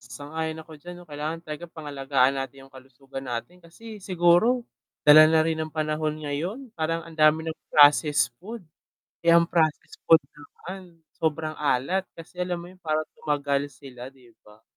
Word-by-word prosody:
Sang-ayon 150 Hz, +6 st, -6 dB
ako 160 Hz, -, -13 dB
diyan 175 Hz, +4 st, -9 dB
'no, 175 Hz, -, -13 dB
kailangan 155 Hz, +2 st, -5 dB
talaga 155 Hz, +2 st, -7 dB
pangalagaan 140 Hz, -4 st, 0 dB
natin 135 Hz, 0 st, -8 dB
yung 135 Hz, -, -24 dB
kalusugan 135 Hz, +1 st, -11 dB
natin 145 Hz, +10 st, -6 dB
kasi 215 Hz, +6 st, -12 dB
siguro, 185 Hz, +7 st, +3 dB, 0.4 s
dala 155 Hz, +1 st, +9 dB
na 160 Hz, 0 st, +3 dB
rin 160 Hz, 0 st, -1 dB
ng 155 Hz, -, -3 dB
panahon 155 Hz, 0 st, -2 dB
ngayon, 185 Hz, -, -4 dB
parang 165 Hz, +1 st, -2 dB
ang 165 Hz, -, -12 dB
dami 155 Hz, 0 st, +4 dB
ng 160 Hz, -, -3 dB, 0.2 s
processed 145 Hz, -4 st, +5 dB
food. 220 Hz, +1 st, -9 dB, 0.6 s
Eh, 170 Hz, -, +7 dB
ang 170 Hz, -, +7 dB
processed 160 Hz, -2 st, -1 dB
food 165 Hz, -2 st, +7 dB
naman, 175 Hz, +3 st, -12 dB, 0.2 s
sobrang 155 Hz, 0 st, -2 dB
alat 150 Hz, +7 st, 0 dB
kasi 165 Hz, +2 st, -13 dB
alam 180 Hz, -1 st, -2 dB
mo, 175 Hz, -, -11 dB
yun 185 Hz, -, -20 dB
parang 155 Hz, -2 st, 0 dB, 0.2 s
tumagal 145 Hz, -1 st, 0 dB
sila 125 Hz, -1 st, -11 dB
‘di 130 Hz, -3 st, -20 dB, 0.2 s
ba. 105 Hz, +1 st, -19 dB
155 Hz, 165 wpm, -25 LUFS, 145-170 Hz, 0.6 s, dala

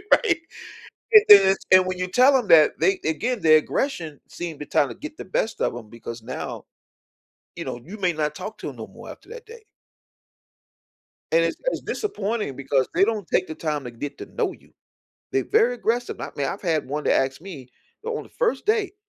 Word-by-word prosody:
Right? 460 Hz, -, +4 dB, 0.8 s
And 425 Hz, -1 st, +10 dB
then 200 Hz, -2 st, +10 dB
it's 195 Hz, -, -4 dB
and 185 Hz, 0 st, +7 dB
when 185 Hz, 0 st, -3 dB
you 185 Hz, -, -1 dB
tell 255 Hz, +8 st, +5 dB
'em 245 Hz, -5 st, -2 dB
that, 155 Hz, -2 st, +7 dB
they 390 Hz, -1 st, +2 dB
again, 225 Hz, +9 st, -1 dB
their 155 Hz, -1 st, +7 dB
aggression 160 Hz, -, -2 dB
seem 170 Hz, -3 st, -6 dB
the 150 Hz, -, -7 dB
time 145 Hz, -, +2 dB
the -, -, -8 dB
get 305 Hz, 0 st, -9 dB
the -, -, -7 dB
best 220 Hz, +4 st, -2 dB
of -, -, 0 dB
'em 115 Hz, -3 st, -10 dB
because 115 Hz, 0 st, -9 dB
now, 130 Hz, +3 st, -6 dB, 0.9 s
you -, -, -5 dB
know, 120 Hz, -, -5 dB
you 190 Hz, +7 st, -9 dB
may 180 Hz, -3 st, +1 dB
not 150 Hz, -2 st, -2 dB
talk 190 Hz, +6 st, -7 dB
to -, -, -6 dB
'em -, -, -13 dB
no -, -, -7 dB
more -, -, -13 dB
after -, -, -13 dB
that 475 Hz, 0 st, -10 dB
day. 455 Hz, 0 st, -13 dB, 1.7 s
And 165 Hz, +1 st, +4 dB
it's 165 Hz, -, -2 dB
it's -, -, -1 dB
disappointing 215 Hz, -, -3 dB
because 135 Hz, -1 st, 0 dB
they 185 Hz, -, +4 dB
don't 210 Hz, -2 st, 0 dB
take 185 Hz, -, +1 dB
the 155 Hz, -, -6 dB
time 150 Hz, -3 st, -3 dB
to 120 Hz, -, -6 dB
get 140 Hz, +5 st, -7 dB
to -, -, -7 dB
know -, -, -2 dB
you. -, -, -17 dB, 0.6 s
They're 135 Hz, -2 st, 0 dB
very 245 Hz, +2 st, +3 dB
aggressive, 240 Hz, +1 st, -2 dB
I -, -, -5 dB
mean, 140 Hz, -1 st, -1 dB
I've 195 Hz, -, -5 dB
had 160 Hz, -7 st, 0 dB
one 150 Hz, +2 st, -3 dB
that -, -, +3 dB
asked 135 Hz, +2 st, 0 dB
me 155 Hz, -9 st, -10 dB, 0.4 s
o 465 Hz, 0 st, -2 dB
on -, -, -6 dB
the -, -, -17 dB
first 480 Hz, -1 st, -1 dB
date, 425 Hz, -2 st, +1 dB
185 Hz, 215 wpm, -23 LUFS, 150-245 Hz, 1.7 s, And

